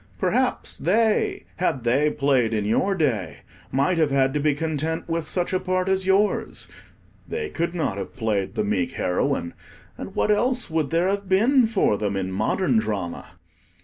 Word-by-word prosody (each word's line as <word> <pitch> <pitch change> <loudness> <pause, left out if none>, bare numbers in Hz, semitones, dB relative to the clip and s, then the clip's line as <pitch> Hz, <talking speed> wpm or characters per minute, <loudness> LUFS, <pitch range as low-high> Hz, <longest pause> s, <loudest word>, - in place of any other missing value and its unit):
Perhaps - - 0
they, 215 +8 +1
had 135 -9 0
they 135 +6 +2
played 135 -6 +1
in 105 -1 -1
your 190 - +1
day, 145 - -1 0.3
might 140 +6 +1
have 155 -2 +3
had 135 -1 +2
to 150 - 0
be 145 0 +2
content 160 +1 -2
with 165 -2 -3
such 180 0 -1
a 185 - +2
part 185 0 -1
as 190 0 +1
yours. 200 +2 +1 0.6
They 450 -2 -4
could 170 +1 -2
not 130 - -1
have 95 - -7
played 105 -5 -1
the - - 0
meek 100 -4 -1
heroine, 90 -1 -1 0.5
and - - -7
what 210 - +2
else 245 0 +1
would 160 -3 0
there 170 +2 +1
have 200 0 -2
been 235 +6 +4
for 195 - +1
them 100 -2 -1
in 95 -1 -2
modern 110 - +1
drama? 100 -6 -4
155 Hz, 175 wpm, -24 LUFS, -, 0.6 s, been